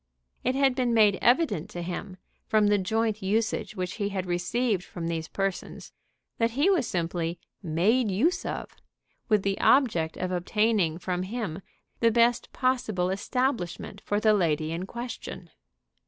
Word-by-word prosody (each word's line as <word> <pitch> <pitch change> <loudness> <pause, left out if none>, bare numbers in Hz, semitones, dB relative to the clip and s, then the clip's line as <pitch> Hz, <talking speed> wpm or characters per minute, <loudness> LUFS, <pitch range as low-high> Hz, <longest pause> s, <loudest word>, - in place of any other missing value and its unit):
It 255 +1 +1
had 270 -1 +3
been 250 -2 +1
made 210 -3 +5
evident 245 - +2
to 175 -4 -5
him, 185 +1 -5 0.3
from 215 -1 +3
the 205 0 +3
joint 220 +2 0
usage 215 +2 -1
which 180 +1 -4
he 200 - +1
had 190 -2 -3
received 185 +4 0
from 170 -2 -7
these 165 -1 -3
persons, 195 -1 -4 0.5
that 230 0 +3
he 330 +8 +4
was 345 -11 +2
simply 170 -1 -2 0.2
"made 205 +8 +2
use 265 - +1
of," - - -5 0.5
with 210 -3 +3
the 195 0 -1
object 210 - +3
of 185 0 -2
obtaining 185 -1 +1
from 180 0 -2
him 195 -3 -4 0.4
the 230 - +4
best 235 +1 +2
possible 220 -8 0
establishment 200 -3 -2
for 205 - 0
the 215 0 +4
lady 160 -5 +1
in 175 +3 -4
question. 235 -8 -7
200 Hz, 155 wpm, -27 LUFS, 180-235 Hz, 0.5 s, made